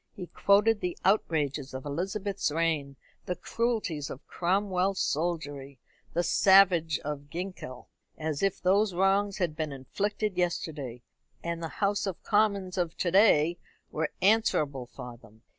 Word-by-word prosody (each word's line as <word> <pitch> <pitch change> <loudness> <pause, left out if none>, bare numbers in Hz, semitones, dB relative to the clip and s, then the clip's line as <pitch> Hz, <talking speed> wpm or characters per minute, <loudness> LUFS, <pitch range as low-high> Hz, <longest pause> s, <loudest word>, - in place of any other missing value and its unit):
He 180 - -6
quoted 205 +4 +3
the 180 -1 -3
outrages 150 -9 +1
of 130 - -6
Elizabeth's 195 +7 -2
reign, 150 -3 -1 0.3
the 180 - -1
cruelties 215 -13 -2
of 135 - -9
Cromwell's 190 +1 0
soldiery, 145 -4 -2 0.4
the 175 - +1
savagery 180 -6 +5
of 145 -1 -5
Ginkell, 175 -8 -7 0.3
as 155 -2 -3
if 195 -1 +1
those 195 +1 +2
wrongs 195 +2 +2
had 170 -5 -1
been 155 -1 -3
inflicted 200 +9 -3
yesterday, 145 -8 -3 0.4
and 170 0 -3
the 165 - -3 0.2
House 205 0 0
of 190 - -5
Commons 200 -3 +1
of 170 -2 -2
to 175 - 0
day 175 -4 +4 0.3
were 155 0 -1
answerable 155 - +2
for 125 -1 -9
them. 110 -1 -20
175 Hz, 140 wpm, -29 LUFS, 145-195 Hz, 0.4 s, savagery